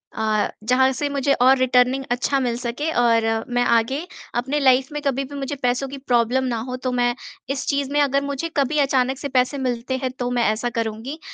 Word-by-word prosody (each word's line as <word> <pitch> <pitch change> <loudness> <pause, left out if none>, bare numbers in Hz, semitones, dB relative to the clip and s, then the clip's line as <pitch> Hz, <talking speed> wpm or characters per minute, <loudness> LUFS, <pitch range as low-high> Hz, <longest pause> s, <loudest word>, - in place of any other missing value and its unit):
अ, 215 -1 +1 0.2
जहाँ 255 +3 +3
से 280 +3 -2
मुझे 280 0 +1
और 260 +1 +5
रिटर्निंग 255 +1 +3
अच्छा 255 +3 +1
मिल 245 -3 -1
सके 245 +6 -3
और 230 -1 +3 0.3
मैं 245 0 +2
आगे 245 +7 +1 0.3
अपने 265 +5 0
लाइफ 260 -1 +3
में 295 0 -4
कभी 275 -1 0
भी 280 +2 -9
मुझे 280 +1 -4
पैसों 250 +2 +1
की 275 - -7
प्रॉब्लम 250 -1 +1
ना 245 -3 -1
हो। 250 - -3
तो 255 - 0
मैं 245 -1 +1 0.3
इस 275 0 -2
चीज़ 280 -1 -1
में 290 0 +2
अगर 280 -1 +2
मुझे 280 +4 -3
कभी 285 +2 +1
अचानक 265 -2 +1
से 285 - -4
पैसे 255 +3 +2
मिलते 255 0 -2
हैं 255 - -1
तो 245 -1 -1
मैं 245 -1 +1
ऐसा 225 +3 -2
करूँगी। 225 +7 -4
260 Hz, 210 wpm, -22 LUFS, 245-275 Hz, 0.3 s, और